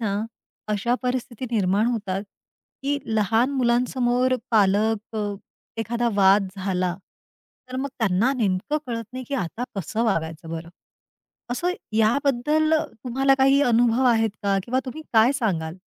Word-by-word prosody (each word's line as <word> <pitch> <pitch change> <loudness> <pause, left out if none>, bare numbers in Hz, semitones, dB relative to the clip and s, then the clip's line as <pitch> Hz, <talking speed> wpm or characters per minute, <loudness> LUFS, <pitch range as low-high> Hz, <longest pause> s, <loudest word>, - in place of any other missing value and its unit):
ना, 200 -3 -1 0.5
अशा 210 +3 +1
परिस्थिती 250 -1 -3
निर्माण 205 -1 +2
होतात, 200 -5 -2 0.6
की 285 +1 0 0.2
लहान 225 +5 +2
मुलांसमोर 250 0 +1 0.2
पालक 215 +1 +2
अ, 205 -1 -2 0.5
एखादा 235 +1 0
वाद 195 0 +5
झाला, 185 -2 -1 0.7
तर 255 - -5
मग 275 +2 -2
त्यांना 220 +3 +2
नेमकं 215 +6 0
कळत 230 -2 -3
नाही 255 0 -6
की 280 - -2
आता 230 +1 -3
कसं 205 +5 -2
वागायचं 165 -5 -2
बरं. 165 0 -5 0.8
असं 345 +9 0 0.2
याबद्दल 280 +7 +2 0.3
तुम्हाला 270 +2 +3
काही 270 +1 +5
अनुभव 240 0 +3
आहेत 225 -2 +3
का? 200 -1 +2
किंवा 255 +3 0
तुम्ही 310 +5 -6
काय 225 +3 +5
सांगाल? 175 - -2
230 Hz, 130 wpm, -24 LUFS, 200-255 Hz, 0.8 s, वाद